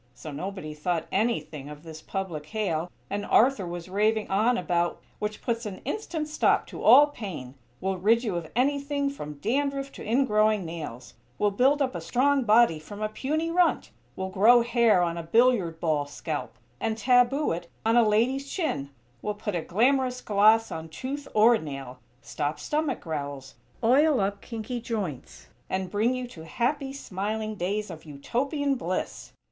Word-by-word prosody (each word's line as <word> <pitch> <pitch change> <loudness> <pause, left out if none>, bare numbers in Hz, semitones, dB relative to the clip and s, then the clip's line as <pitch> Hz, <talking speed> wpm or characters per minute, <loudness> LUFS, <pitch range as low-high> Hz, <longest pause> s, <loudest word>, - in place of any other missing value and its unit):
So 155 - -8
nobody 180 0 -5
thought 165 +2 -2
anything 155 - -1
of 150 +1 -10
this 160 -1 -9
public 170 -6 -5
hail 180 -6 -2 0.2
and 205 +1 -3
Arthur 225 -5 +3
was 175 0 -6
raving 210 +3 +1
on 225 +5 +3
about 175 -5 0 0.2
"which 210 0 -4
puts 230 -1 -1
an 195 -2 -7
instant 340 -8 -3
stop 305 - +2
to - - -8
all 290 - +8
pain; 190 - -7 0.3
will 190 -1 -2
rid 225 +5 +3
you 210 -7 -2
of 170 -2 -4
anything 280 +2 +1
from 150 - -7
dandruff 275 - -1
to - - -10
ingrowing 215 -4 +2
nails; 150 -7 -7 0.2
will 205 -1 +2
build 270 +7 +3
up 260 - -2
a - - -5
strong 275 +1 +2
body 215 -7 +5
from 205 +7 -10
a 215 0 -1
puny 310 +9 -2
runt; 350 0 +2 0.2
will 190 0 -3
grow 230 +5 +6
hair 235 -6 +3
on 170 0 -1
a - - -3
billiard 190 -2 +2
ball 155 -4 0
scalp, 145 - -5 0.2
and 220 -1 -1
taboo 250 +4 +3
it 170 +1 -4 0.2
on 225 +1 +3
a 240 - +7
lady's 240 +6 +1
chin; 310 - -2 0.3
will 210 - -2
put 210 0 -4
a 175 - -1
glamorous 250 +7 +2
gloss 215 +1 +4
on 160 0 -6
tooth 270 - -5
or 225 +2 +6
nail; 135 -5 -7 0.2
stop 150 0 -3
stomach 300 -3 -1
growls; 140 -4 -5 0.3
oil 275 +5 +4
up 200 0 -1
kinky 230 +1 -5
joints, 205 - -5 0.2
and 185 -1 -2
bring 225 +5 +1
you 255 0 -3
to 170 -10 -11
happy, 270 - -1
smiling 215 -3 -3
days 205 +1 -2
of 160 -2 -10
Utopian 270 - -1
bliss! 185 -8 -4
215 Hz, 170 wpm, -27 LUFS, 170-250 Hz, 0.3 s, all